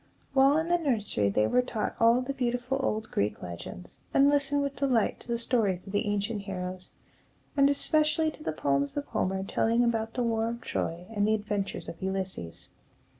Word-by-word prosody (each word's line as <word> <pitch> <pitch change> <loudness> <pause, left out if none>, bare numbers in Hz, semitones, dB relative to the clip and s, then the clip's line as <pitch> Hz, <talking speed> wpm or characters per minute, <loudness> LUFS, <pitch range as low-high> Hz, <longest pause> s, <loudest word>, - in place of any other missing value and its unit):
While 275 +2 +5
in 320 +1 0
the 350 0 +3
nursery, 210 - +1
they 105 +2 +2
were 250 - +3
taught 235 -4 -3
all 230 +2 +5
the 275 +2 -3
beautiful 250 +1 -1
old 220 -4 -2
Greek 105 +1 -1
legends, 85 - -6 0.2
and 280 +1 +6
listened 285 0 +2
with 280 -2 -3
delight 250 -5 +1
to - - -14
the 235 -1 0
stories 220 -7 0
of 195 - -9
the 205 +2 +1
ancient 205 +1 -1
heroes, 185 -2 -5 0.7
and 280 -1 +5
especially 310 +2 +2
to 305 - -15
the - - -2
poems 140 - 0
of 290 - -1
Homer 190 +1 -1
telling 230 +4 +2
about 225 -1 0
the 250 - 0
war 225 -1 +1
of 235 +1 -5
Troy 170 -5 -3
and 205 -2 +1
the 220 - +4
adventures 205 -2 -3
of 170 - -8
Ulysses. 190 - -4
225 Hz, 190 wpm, -29 LUFS, 190-270 Hz, 0.7 s, and